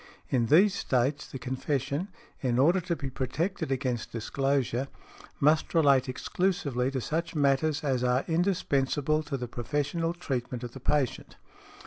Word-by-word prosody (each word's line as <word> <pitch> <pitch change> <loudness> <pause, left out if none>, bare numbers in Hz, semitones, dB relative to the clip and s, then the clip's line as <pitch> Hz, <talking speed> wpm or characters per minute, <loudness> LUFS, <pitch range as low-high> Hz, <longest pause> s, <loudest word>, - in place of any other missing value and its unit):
In 120 -3 +2
these 185 - +6
States 135 -3 0
the - - -7
confession, 140 +5 -2 0.3
in 125 -3 +1
order 170 +8 +4
to 175 0 -2
be 140 -4 -5
protected 140 +6 -2
against 125 -3 -2
disclosure, 135 +2 0 0.5
must 155 +4 +2
relate 140 -5 +4
exclusively 140 - -1
to 135 -1 -2
such 165 +7 -2
matters 145 +1 +2
as 130 -4 0
are 125 +1 +2
indispensable 155 -4 +1
to 145 -3 -4
the 125 -1 -4
professional 145 +8 -2
treatment 125 -7 -3
of 120 - -5
the 135 - -10
patient. 135 0 -1
140 Hz, 140 wpm, -28 LUFS, 130-160 Hz, 0.5 s, these